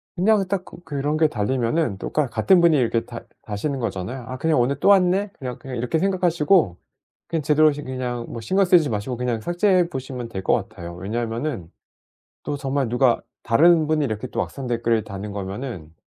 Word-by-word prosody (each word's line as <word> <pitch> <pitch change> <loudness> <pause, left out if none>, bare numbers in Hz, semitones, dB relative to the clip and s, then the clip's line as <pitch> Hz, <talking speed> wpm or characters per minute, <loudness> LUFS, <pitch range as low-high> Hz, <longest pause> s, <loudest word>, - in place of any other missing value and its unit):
그냥 195 +1 +3
딱 190 -1 -1
그 - - -12
그런 145 +1 -2
게 160 -1 +4
달리면은 120 0 0
또 - - -5
가 150 -3 +1
같은 180 +9 +3
분이 165 -3 +5
이렇게 115 -2 +1
다 120 -1 -8 0.2
다시는 130 +7 -3
거잖아요. 115 +3 -4
'아 130 - -5
그냥 155 -1 +2
오늘 135 +3 +1
또 200 - +3
왔네.' 195 +1 +4
그냥 125 -2 -5
그냥 130 -2 -8
이렇게 125 +7 0
생각하시고 175 - +2 0.5
그냥 165 -2 -1
제대로 150 +1 +4
저 145 +1 -6
그냥 125 -2 -4
뭐 115 - -6
신경 190 - +1
쓰지 175 -6 +4
마시고 110 +3 -3
그냥 120 -3 -2
삭제해 175 - +2
보시면 130 -4 -6
될 95 -1 -5
것 - - +2
같아요. 85 0 -4
왜냐하면은 115 - -3 0.7
또 145 - -2
정말 135 -2 -1
누가 120 0 +2 0.2
다른 160 +6 +4
분이 155 -2 +2
이렇게 110 +1 -3
또 - - -3
악성 135 -2 -6
댓글을 115 -2 +1
다는 100 0 -7
거면은 100 - -6
130 Hz, 390 characters per minute, -23 LUFS, 115-160 Hz, 0.7 s, 분이